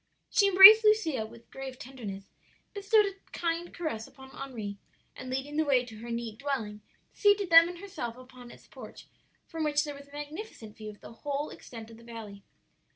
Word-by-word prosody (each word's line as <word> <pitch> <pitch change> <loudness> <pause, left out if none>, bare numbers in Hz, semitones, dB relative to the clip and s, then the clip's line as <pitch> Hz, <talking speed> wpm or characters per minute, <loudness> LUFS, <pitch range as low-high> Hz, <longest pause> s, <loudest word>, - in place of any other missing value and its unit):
"She 405 -4 +4
embraced 395 +3 +10
Lucia 325 - +2
with 230 +1 -17
grave 265 -1 -8
tenderness, 215 -8 -8 0.5
bestowed 415 +1 +3
a 400 - -2 0.2
kind 340 0 -3
caress 310 -10 -5
upon 265 0 -15
Henri, 215 -8 -7 0.4
and 255 - -9
leading 270 +3 -4
the 315 - +3
way 265 -4 +2
to 225 -3 -12
her 235 +2 -9
neat 230 -2 -5
dwelling, 225 -7 -4 0.3
seated 405 -3 +2
them 330 +1 +8
and 355 - -8
herself 340 -12 -7
upon 255 -1 -14
its - - -15
porch, - - -12 0.4
from 325 -1 -5
which 295 -1 +1
there 295 - -6
was 280 0 -13
a - - -22
magnificent 295 - -9
view 215 -1 -9
of 210 - -13
the - - -12
whole 285 +4 -4
extent 225 -2 -11
of 225 - -13
the 230 - -16
valley. 220 -4 -10
270 Hz, 190 wpm, -29 LUFS, 230-330 Hz, 0.5 s, embraced